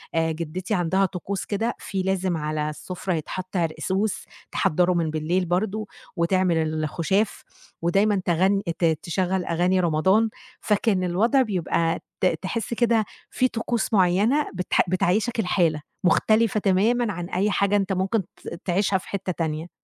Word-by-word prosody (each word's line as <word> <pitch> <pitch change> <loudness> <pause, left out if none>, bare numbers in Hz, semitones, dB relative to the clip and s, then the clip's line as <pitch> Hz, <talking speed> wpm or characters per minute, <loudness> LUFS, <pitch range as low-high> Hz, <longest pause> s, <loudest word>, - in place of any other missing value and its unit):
آآ 165 0 +2
جِدّتي 170 +5 -4
عندها 185 +1 +2
طقوس 190 +1 -4
كده 220 +3 -1
في 195 -2 -3
لازم 185 -2 0
على 150 0 -2
السُفرة 180 +4 -4
يتحَط 185 +4 -4
عرقسوس 190 +5 -1 0.3
تحضّره 180 +3 +2
من 170 -2 0
بالليل 160 +4 0
برضه، 205 +4 -1 0.3
وتعمل 180 0 +2 0.3
الخُشاف 175 +6 0 0.4
ودايمًا 195 +3 +2
تغن 190 +4 +2 0.2
ت 170 - +3
تشغّل 175 +3 0
أغاني 180 +2 +1
رمضان، 190 +7 +3 0.3
فكان 205 -2 +1
الوضع 215 +10 +3
بيبقى 175 -6 0 0.2
ت - - +3 0.2
تحِس 225 +5 -3
كده 230 -2 +2 0.2
في 255 - +2
طقوس 235 -1 -2
معيّنة 205 +10 +3
بتح 180 -1 +1
بتعيّشك 210 +6 +1
الحالة، 170 -6 +1 0.2
مختلفة 215 +3 +3
تمامًا 210 +4 +2
عن 175 0 -5
أي 200 +3 +1
حاجة 200 0 +2
أنت 195 -1 +1
ممكن 190 +3 0
ت - - -8
تعيشها 190 +2 +2
في 185 - -11
حتّه 195 -2 -3
تانية. 160 0 -3
185 Hz, 140 wpm, -24 LUFS, 170-205 Hz, 0.4 s, ت